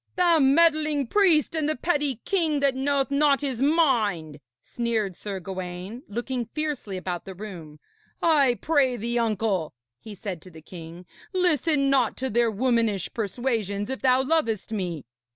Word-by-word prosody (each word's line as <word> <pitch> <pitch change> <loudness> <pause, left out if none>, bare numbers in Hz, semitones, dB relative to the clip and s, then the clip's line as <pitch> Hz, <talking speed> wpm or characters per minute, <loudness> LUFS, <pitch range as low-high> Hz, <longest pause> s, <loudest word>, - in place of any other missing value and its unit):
'The 345 -3 +4
meddling 305 0 +3
priest 335 - +3
and 310 -2 0
the 310 - 0
petty 290 -4 -1
king 325 -7 +1
that 280 -1 +2
knoweth 275 +1 0
not 280 0 +3
his 265 -4 -2
mind!' 225 - +1 0.2
sneered 220 - -2
Sir 200 0 -5
Gawaine, 185 +4 -6
looking 240 +2 -3
fiercely 295 -11 -3
about 180 -1 -4
the 190 - -8
room. 170 -7 -9 0.4
'I 280 -7 +3
pray 275 -6 +2
thee, 235 +2 -1
uncle,' 210 - -1 0.2
he 215 -2 -10
said 185 -3 -6
to 185 - -13
the 160 -3 -14
king, 170 +1 -10 0.3
'listen 315 -6 +2
not 255 -5 +2
to 265 0 -2
their 235 +1 +3
womanish 225 -3 0
persuasions, 215 -1 -2
if 265 - -4
thou 260 0 +3
lovest 260 - 0
me.' 180 -8 -3
240 Hz, 150 wpm, -25 LUFS, 200-285 Hz, 0.4 s, The